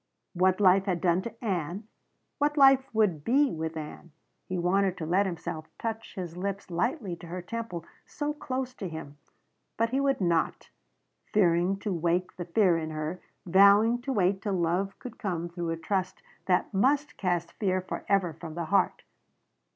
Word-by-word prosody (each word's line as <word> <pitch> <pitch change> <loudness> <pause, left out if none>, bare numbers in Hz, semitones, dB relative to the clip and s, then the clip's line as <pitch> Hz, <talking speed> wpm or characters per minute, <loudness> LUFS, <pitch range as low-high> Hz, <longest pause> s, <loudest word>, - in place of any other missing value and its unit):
What 185 +1 +2
life 195 -1 +5
had 185 -4 0
done 175 0 +2
to 230 +3 -8
Ann. 185 +1 -2 0.5
What 295 +1 +1
life 270 -1 +6
would 205 -9 +1
be 275 - +3
with 160 0 -4
Ann. 155 +2 -8 0.4
He 185 - -1
wanted 190 +2 +1
to 160 - -4
let 190 +5 +2
himself 170 -2 -5
touch 225 -1 -5
his 175 -3 -5
lips 195 +1 -4
lightly 205 - -1
to 170 - -11
her 180 +1 -5
temple 180 -5 -5 0.2
so 295 0 -3
close 260 -3 -4
to 190 - -4
him. 155 -3 -8 0.6
But 230 +1 +1
he 265 - +1
would 275 -1 +1
not 170 -4 0 0.6
fearing 180 -1 +3
to 205 - -2
wake 175 +2 0
the 175 - -4
fear 180 -1 +3
in 160 -1 -4
her, 155 +3 -4 0.2
vowing 200 +6 +5
to 270 +2 -3
wait 190 -4 +1
till 205 -1 -2
love 180 +3 0
could 240 -2 -10
come 175 -6 -2
through 170 -1 -4
a 165 - -2
trust 185 +3 -2 0.2
that 180 +2 +1
must 280 +9 +2
cast 175 -3 -1
fear 185 -3 +1
forever 185 -1 -1
from 160 0 -9
the 170 -1 -3
heart. 200 - +2
185 Hz, 175 wpm, -28 LUFS, 170-220 Hz, 0.6 s, life